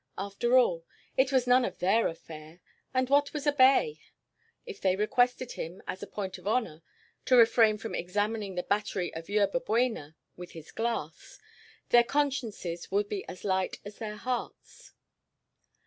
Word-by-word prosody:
After 200 +6 +1
all, 175 -10 +3 0.3
it 260 +1 +2
was 260 -2 +2
none 250 +1 +5
of - - -3
their 200 +6 +2
affair, 160 0 -10 0.3
and 255 0 +1
what 285 +2 +2
was 300 -1 -4
a 290 - +4
bay? 280 - +4 0.7
If 445 -4 -9
they 185 -1 +2
requested 245 +4 +1
him, 170 +4 -7
as 185 - -6
a 205 - -6
point 190 -3 -5
of 180 - -10
honor, 215 -8 -1 0.4
to 255 - +4
refrain 225 -2 +5
from 220 +2 -7
examining 205 +2 -2
the 180 - -2
battery 200 -3 -1
of 165 +2 -8
Yerba 205 +3 +2
Buena 230 - -1 0.2
with 180 0 -10
his 160 -2 -11
glass, 225 -9 -4 0.5
their 240 0 +6
consciences 235 -11 -2
would 205 +1 0
be 200 -2 -3
as 180 - -9
light 190 -2 0
as 205 0 -10
their 215 -2 -5
hearts. 250 +3 -6
210 Hz, 165 wpm, -29 LUFS, 185-250 Hz, 0.7 s, their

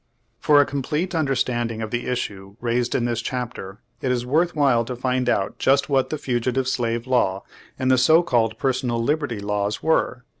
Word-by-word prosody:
For 150 -1 +5
a 145 - +5
complete 150 +6 -2
understanding 120 -7 -1
of 110 - -5
the 120 0 -2
issue 100 -5 -4
raised 120 0 -1
in 120 - +1
this 120 -1 -1
chapter, 115 -6 -5 0.2
it 130 - 0
is 120 -1 -1
worth 160 +7 +1
while 135 -6 +3
to 125 +1 -5
find 125 0 0
out 95 -4 -1
just 140 +2 +2
what 135 -2 +2
the 155 - -2
Fugitive 125 0 -1
Slave 115 -2 -1
Law, 110 -7 +1 0.3
and 130 0 +1
the 130 - +4
so 160 +7 +5
called 115 -7 +1
Personal 125 -2 -1
Liberty 145 -4 -1
Laws 105 0 -2
were. 130 -5 +1
125 Hz, 185 wpm, -23 LUFS, 115-135 Hz, 0.3 s, For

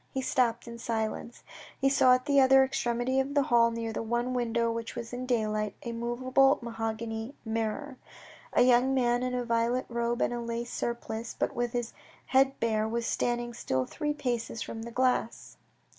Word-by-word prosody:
He 265 - -3
stopped 240 -3 +1
in 235 0 -8
silence. 230 +1 -3 0.4
He 270 - +3
saw 260 -2 +5
at 255 - -3
the 280 -1 +4
other 265 0 +7
extremity 245 0 0
of 275 +2 -1
the 285 - +4
hall, 235 -2 +4
near 230 -1 -4
the - - -3
one 240 +2 -1
window 235 -1 0
which 230 0 -5
let 235 0 -6
in 245 - -4
the 255 - -5
daylight, 215 -4 0
a 235 - -4
movable 255 +4 +2
mahogany 225 +2 -4
mirror. 225 +5 -3 0.6
A - - +5
young 255 +2 +4
man 245 -1 +2
in 250 0 -1
a 245 -1 -2
violet 235 +2 +1
robe 235 0 0
and - - 0
a 240 - -3
lace 235 +1 -4
surplice, 235 -1 -4
but - - -1
with 240 0 -2
his 240 -1 -2 0.3
head 270 +1 +3
bare, 220 -1 +1
was 230 +1 -2
standing 240 0 -1
still 130 - -1
three 295 - -3
paces 240 -4 -2
from 225 - -7
the 235 - -6
glass. 250 -2 -1
240 Hz, 190 wpm, -29 LUFS, 230-255 Hz, 0.6 s, other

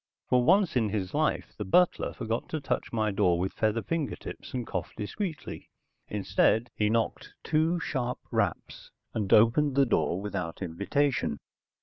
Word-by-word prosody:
For 125 -1 +3
once 185 +2 +4
in 115 -4 +2
his 95 -3 -3
life - - 0
the - - -1
butler 180 - +3
forgot 115 -1 -3
to 155 - -2
touch 140 - -2
my 110 -2 0
door 90 -3 +2
with 95 +2 -2
feather 110 +1 0
fingertips 165 -4 -4
and 125 -2 -3
cough 95 -4 -4
discreetly. 160 - -5 0.4
Instead 105 +3 +1
he 105 -1 +1
knocked 115 0 -1
two 160 +3 +1
sharp 125 -5 -2
raps, - - -2 0.2
and 105 -3 -2
opened 130 +6 +5
the 140 0 +5
door 95 -6 +1
without 95 -4 -4
invitation. 100 - 0
115 Hz, 150 wpm, -28 LUFS, 100-140 Hz, 0.4 s, opened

